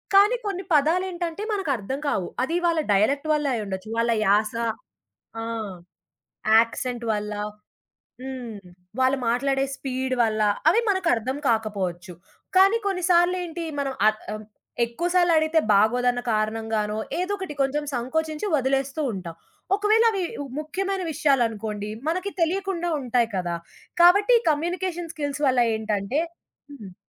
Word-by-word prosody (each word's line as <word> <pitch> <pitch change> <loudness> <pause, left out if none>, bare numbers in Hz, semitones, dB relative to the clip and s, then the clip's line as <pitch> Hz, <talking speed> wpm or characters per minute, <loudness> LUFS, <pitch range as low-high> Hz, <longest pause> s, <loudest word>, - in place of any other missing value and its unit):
కానీ, 415 +5 +6
కొన్ని 385 -2 -3
పదాలేంటంటే 345 +4 0
మనకర్థం 275 - -2
కావు. 180 - -1
అది 330 +6 0
వాళ్ళ 330 -2 +2
డయలెక్ట్ 280 +10 +2
వల్ల 295 -1 0
అయ్యుండొచ్చు. 195 -1 -5
వాళ్ళ 230 0 +2
యాస 210 +3 +3 0.9
ఆ! - - -4 1.1
యాక్సెంట్ 235 +1 0
వల్ల. 210 0 -3 0.9
హ్మ్. 250 -5 -6 0.4
వాళ్ళు 260 +1 +3
మాట్లాడే 270 +3 +1
స్పీడ్ 260 -1 -2
వల్ల, 215 -1 0 0.3
అవి 455 - +4
మనకర్థం 270 - 0
కాకపోవచ్చు. 190 -5 -2 0.4
కానీ, 390 +4 +6
కొన్నిసార్లేంటి? 350 -2 +1 0.2
మనం 270 -1 -2
అత్ 215 0 -1
ఆహ్, 215 - -7 0.4
ఎక్కువసార్లడిగితే 330 +3 +2
బాగోదన్న 245 +4 +3
కారణంగానో 215 -1 -1 0.2
ఏదోకటి 380 -3 -3
కొంచెం 285 +2 +1
సంకోచించి 310 - -2
వదిలేస్తూ 270 +1 0
ఉంటాం. 175 -4 -6 0.4
ఒకవేళ 430 +2 +3
అవి 390 -3 -2 0.2
ఉ - - -5
ముఖ్యమైన 380 +5 -2
విషయాలనుకోండి, 225 -8 0 0.2
మనకి 370 +4 -1
తెలియకుండా 350 0 0
ఉంటాయి 245 -2 +1
కదా! 175 -2 -1 0.5
కాబట్టి 405 +7 +6
కమ్యూనికేషన్ 345 +2 -2
స్కిల్స్ 290 -1 -3
వల్ల 255 -2 +3 0.2
ఏంటంటే 215 +5 -1 0.5
హ్మ్. 205 -10 -11
275 Hz, 115 wpm, -24 LUFS, 225-345 Hz, 1.1 s, కానీ